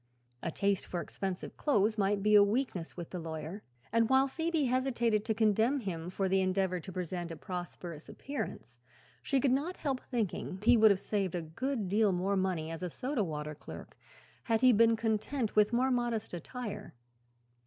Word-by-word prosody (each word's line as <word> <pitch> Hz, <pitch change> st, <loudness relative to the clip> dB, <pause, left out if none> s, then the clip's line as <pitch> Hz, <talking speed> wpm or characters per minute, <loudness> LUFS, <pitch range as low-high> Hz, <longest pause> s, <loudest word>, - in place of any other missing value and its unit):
A -, -, -2 dB
taste 200 Hz, +3 st, 0 dB
for 175 Hz, -, -3 dB
expensive 185 Hz, +3 st, -5 dB
clothes 215 Hz, -7 st, +2 dB
might 200 Hz, -1 st, +1 dB
be 210 Hz, 0 st, +3 dB
a 205 Hz, -, +9 dB
weakness 205 Hz, -6 st, -1 dB
with 170 Hz, -2 st, -7 dB
the 180 Hz, -, -4 dB
lawyer, 160 Hz, +4 st, -6 dB, 0.3 s
and 230 Hz, 0 st, +3 dB
while 265 Hz, +1 st, +5 dB
Phoebe 325 Hz, +2 st, -1 dB
hesitated 240 Hz, -4 st, +1 dB
to 220 Hz, -, 0 dB
condemn 225 Hz, +5 st, +3 dB
him 175 Hz, -5 st, -4 dB
for 190 Hz, +1 st, -1 dB
the 190 Hz, 0 st, +3 dB
endeavor 185 Hz, -1 st, +1 dB
to 190 Hz, -, -9 dB
present 180 Hz, -1 st, -4 dB
a 165 Hz, -, -6 dB
prosperous 175 Hz, -2 st, -7 dB
appearance 285 Hz, +1 st, -6 dB, 0.4 s
she 275 Hz, -, +1 dB
could 260 Hz, 0 st, +2 dB
not 295 Hz, +8 st, 0 dB
help 270 Hz, -4 st, -2 dB
thinking 210 Hz, -5 st, -2 dB
he 240 Hz, +2 st, +6 dB
would 220 Hz, -1 st, +7 dB
have 200 Hz, -2 st, +3 dB
saved 195 Hz, -3 st, -1 dB
a 175 Hz, -, -2 dB
good 220 Hz, -, -3 dB
deal 205 Hz, +2 st, +3 dB
more 185 Hz, +2 st, 0 dB
money 180 Hz, -4 st, -1 dB
as 165 Hz, -, -6 dB
soda 260 Hz, -, -1 dB
water 150 Hz, -3 st, -4 dB
clerk 150 Hz, -, -10 dB, 0.5 s
had 225 Hz, -1 st, +1 dB
he 255 Hz, -1 st, +7 dB
been 230 Hz, +1 st, +5 dB
content 225 Hz, +2 st, -1 dB
with 210 Hz, 0 st, +5 dB
more 255 Hz, +2 st, +2 dB
modest 240 Hz, -5 st, -1 dB
attire. 215 Hz, -, -6 dB
205 Hz, 180 wpm, -32 LUFS, 180-240 Hz, 0.5 s, a